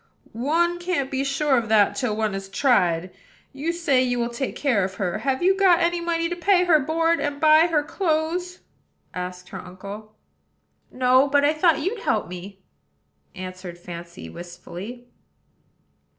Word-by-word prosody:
"One 335 Hz, +8 st, +1 dB
can't 345 Hz, -7 st, -2 dB
be 270 Hz, 0 st, -1 dB
sure 275 Hz, -1 st, +2 dB
of 225 Hz, -2 st, -6 dB
that 210 Hz, -2 st, +4 dB
till 245 Hz, -6 st, -1 dB
one 215 Hz, -2 st, -1 dB
has 195 Hz, 0 st, -6 dB
tried. 185 Hz, -, +2 dB, 0.4 s
You 290 Hz, +5 st, -2 dB
say 330 Hz, -7 st, +2 dB
you 245 Hz, -1 st, 0 dB
will 235 Hz, 0 st, -1 dB
take 255 Hz, +3 st, -4 dB
care 245 Hz, -9 st, +1 dB
of 185 Hz, 0 st, -4 dB
her: 195 Hz, 0 st, -2 dB
have 265 Hz, +6 st, -1 dB
you 380 Hz, +1 st, +4 dB
got 380 Hz, -3 st, +4 dB
any 345 Hz, 0 st, +1 dB
money 335 Hz, -1 st, 0 dB
to 350 Hz, -, -3 dB
pay 360 Hz, +1 st, +3 dB
her 335 Hz, -4 st, +5 dB
board, 330 Hz, +4 st, +1 dB
and 290 Hz, -1 st, -2 dB
buy 310 Hz, +2 st, +6 dB
her 310 Hz, -4 st, +1 dB
clothes?" 340 Hz, +2 st, -2 dB, 0.5 s
asked 180 Hz, 0 st, -6 dB
her -, -, -7 dB
uncle. 200 Hz, +4 st, -10 dB, 0.8 s
"No; 255 Hz, +2 st, +3 dB
but 285 Hz, 0 st, +3 dB
I 295 Hz, -, +3 dB
thought 320 Hz, 0 st, +3 dB
you'd 425 Hz, +5 st, -2 dB
help 220 Hz, -, 0 dB
me," 185 Hz, +2 st, -9 dB, 0.7 s
answered 185 Hz, -1 st, -8 dB
Fancy 175 Hz, 0 st, -9 dB
wistfully. 175 Hz, +7 st, -9 dB
265 Hz, 165 wpm, -23 LUFS, 195-330 Hz, 0.8 s, buy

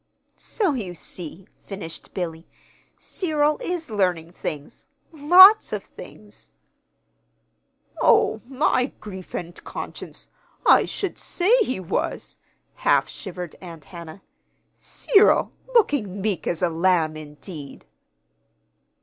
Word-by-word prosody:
"So 390 Hz, -9 st, -1 dB
you 195 Hz, -9 st, -5 dB
see," 175 Hz, +2 st, -7 dB, 0.2 s
finished 190 Hz, -5 st, -9 dB
Billy, 165 Hz, -2 st, -4 dB, 0.5 s
"Cyril 305 Hz, -4 st, 0 dB
is 345 Hz, -7 st, -4 dB
learning 180 Hz, -5 st, 0 dB
things 150 Hz, -4 st, -7 dB, 0.2 s
lots 360 Hz, +8 st, +7 dB
of -, -, -3 dB
things." -, -, -14 dB, 1.5 s
"Oh, -, -, +4 dB
my 265 Hz, -1 st, +1 dB
grief 190 Hz, -4 st, -9 dB
and 175 Hz, 0 st, -5 dB
conscience! -, -, -7 dB, 0.4 s
I -, -, +6 dB
should 390 Hz, -4 st, -4 dB
say 380 Hz, +7 st, +2 dB
he 260 Hz, -, 0 dB
was," 180 Hz, -, -3 dB, 0.4 s
half -, -, +2 dB
shivered 180 Hz, -4 st, -7 dB
Aunt 165 Hz, -5 st, -10 dB
Hannah. 170 Hz, +1 st, -10 dB, 0.6 s
"Cyril 420 Hz, -2 st, +3 dB, 0.2 s
looking 255 Hz, -, +2 dB
meek 200 Hz, -2 st, -2 dB
as 170 Hz, +1 st, -2 dB
a 175 Hz, -, +3 dB
lamb, 165 Hz, -2 st, +2 dB
indeed!" 150 Hz, -1 st, -10 dB
190 Hz, 105 wpm, -23 LUFS, -, 1.5 s, lots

